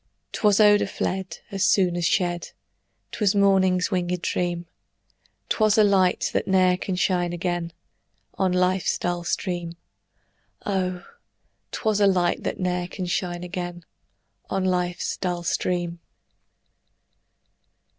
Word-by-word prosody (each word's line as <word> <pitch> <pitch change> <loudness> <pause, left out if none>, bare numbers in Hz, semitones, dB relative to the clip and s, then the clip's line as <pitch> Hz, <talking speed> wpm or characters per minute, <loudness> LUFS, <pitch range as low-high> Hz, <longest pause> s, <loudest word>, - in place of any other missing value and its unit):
'Twas 205 -1 +2
odor 205 -1 +5
fled 190 -2 -4
As 195 -1 -1
soon 185 -3 +3
as 175 -1 -1
shed; 175 -2 -1 0.6
'Twas 205 -2 +1
morning's 190 -2 +3
winged 180 -1 -1
dream; 175 -1 -1 0.8
'Twas 215 -1 +2
a 215 - +7
light, 190 -3 +2
that - - 0
ne'er 185 -1 +4
can 185 +1 -3
shine 180 -1 +1
again 175 -1 -2 0.6
On 190 -1 0
life's 180 0 +1
dull 175 -1 -2
stream: 170 -1 -3 0.9
Oh! 185 -2 -2 0.7
'twas 215 -2 0
light 185 -3 +3
that - - -3
ne'er 180 -1 -1
can 185 +1 -5
shine 175 -1 -2
again 175 -1 -6 0.6
On 190 -1 -1
life's 180 -1 -1
dull 175 -2 -2
stream. 175 0 -1
180 Hz, 115 wpm, -24 LUFS, 175-190 Hz, 0.9 s, a